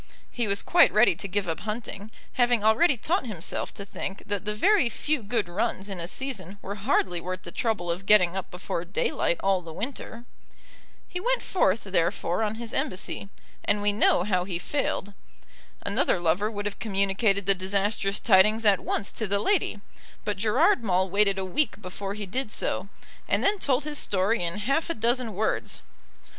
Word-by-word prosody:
He 235 -2 -1
was 200 0 +2
quite 345 0 +5
ready 215 -1 +5
to 200 - -6
give 195 0 -2
up 165 - -2
hunting, 215 0 -6 0.2
having 240 -3 +2
already 240 +7 +4
taught 320 - -1
himself 190 -6 -3
to 200 - -6
think 195 0 -6
that 205 -1 -3
the 210 0 -1
very 385 - +3
few 295 +4 -1
good 215 -1 -1
runs 200 +2 -2
in 195 -2 -5
a 170 - -2
season 200 -5 -5
were 200 - -4
hardly 195 -5 0
worth 185 +1 -5
the 170 - -7
trouble 195 -7 -1
of 185 +3 -5
getting 185 -4 +5
up 190 - -4
before 180 -1 -4
daylight 175 -1 0
all 195 -1 +2
the 165 -2 -9
winter. 230 - -6 0.8
He 360 - -5
went - - 0
forth, 225 - +1
therefore, 180 0 0
on 215 0 0
his 235 0 -6
embassy, 195 +1 -2 0.3
and 205 0 +1
we 205 0 +1
know 205 -3 +3
how 185 -2 +1
he 180 -2 -3
failed. 205 -2 -2 0.7
Another - - +1
lover 175 +5 +1
would 205 -2 -5
have 205 - -4
communicated 200 -1 +1
the 195 - +6
disastrous 195 +1 -1
tidings 215 +2 +4
at 200 -2 +5
once 200 - -2
to 220 - -4
the 200 +1 +2
lady; 215 - 0 0.4
but 210 - -1
Gerard 245 - +3
Maule 190 -2 +1
waited 200 0 +3
a 190 - -2
week 205 +5 0
before 195 0 -6
he 210 -1 -5
did 245 +4 -3
so, 185 - -2 0.4
and - - +1
then 405 0 +2
told 270 -3 +1
his 300 -1 -1
story 195 +2 +1
in 170 +3 -2
half 295 +6 +1
a - - -1
dozen 235 -1 +1
words. 215 +3 -1
205 Hz, 185 wpm, -26 LUFS, 190-235 Hz, 0.8 s, the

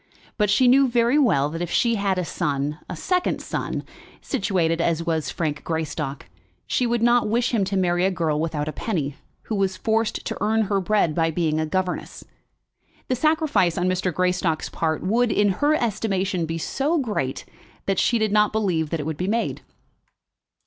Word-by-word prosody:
But 210 -3 +1
she 250 +5 +4
knew 270 +2 +6
very 240 +3 +3
well 170 - +3
that 165 +2 -5
if 175 - -2
she 235 +6 +2
had 200 -2 -1
had 190 -1 +2
a 180 - -1
son, 145 0 -2
a - - -4
second 360 - 0
son, - - -4 0.4
situated 180 - 0
as 165 -1 +1
was 160 -2 -1
Frank 150 -3 -3
Greystock, 150 -4 -3 0.4
she 250 - 0
would 235 -1 0
not 240 -2 +4
wish 240 +3 +1
him 215 -4 +2
to 195 +1 -1
marry 175 -1 +1
a 190 - +4
girl 165 -5 -1
without 155 -2 -2
a - - -1
penny, 150 -10 -3 0.3
who - - -5
was 195 -2 0
forced 225 0 0
to 225 - -3
earn 220 +1 +2
her 200 -1 0
bread 190 -4 +2
by 165 0 +1
being 160 -1 0
a 155 - -1
governess. 185 +1 -3 0.9
The 255 - +2
sacrifice 305 - +2
on 180 - +1
Mr. 185 0 0
Greystock's 180 -2 0
part 160 -1 -2
would, 230 +5 +2
in 205 0 +3
her 290 +11 +2
estimation, 195 - -1
be 165 +1 -3
so 275 - -1
great, 210 - -2 0.4
that 195 -2 +1
she 235 - +3
did 220 -2 0
not 210 0 +3
believe 180 -8 0
that 165 - -2
it 145 - -4
would 160 -1 -3
be 180 - -2
made. 230 +3 -1
185 Hz, 190 wpm, -23 LUFS, 165-225 Hz, 0.9 s, knew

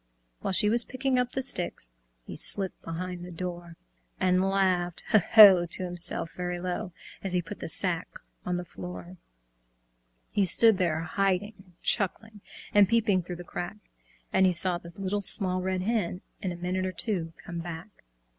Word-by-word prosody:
While - - -3
she 210 - +6
was 235 +3 +3
picking 260 0 -1
up 250 0 -1
the 265 - -1
sticks 175 - -2 0.3
He - - -8
slipped 195 -2 +1
behind 175 +2 -5
the 180 - -8
door, 175 -1 -6 0.4
And 185 0 +3
laughed 185 -3 0
"Ho! 215 - +7
Ho!" 195 -6 +9
to 185 - -2
himself, 175 -2 -4
very 180 0 -3
low, 180 +2 -4 0.3
As 190 -2 0
he 180 - +2
put 200 +5 -9
the - - -5
sack 180 0 +2 0.4
on 180 0 -2
the 180 - -5
floor. 90 - -9 1.1
He 205 - +2
stood 215 +3 +4
there, 165 -3 +1
hiding 195 +4 0
and 185 -2 -19
chuckling, 215 +1 -1 0.3
And 205 -2 +6
peeping 215 -5 +2
through 180 +1 -7
the 175 - -9
crack, 175 +3 -6 0.6
And 190 0 +5
he 180 - +2
saw 175 0 0
the 170 - -12
Little 195 +1 -2
Small 185 -2 +4
Red 185 0 -2
Hen, 200 -4 -1 0.2
In 190 -3 -2
a - - -5
minute 185 +2 -2
or 185 - -4
two, 170 -5 -3
come 170 -1 -7
back. 170 +4 -9
185 Hz, 175 wpm, -28 LUFS, 175-200 Hz, 1.1 s, Ho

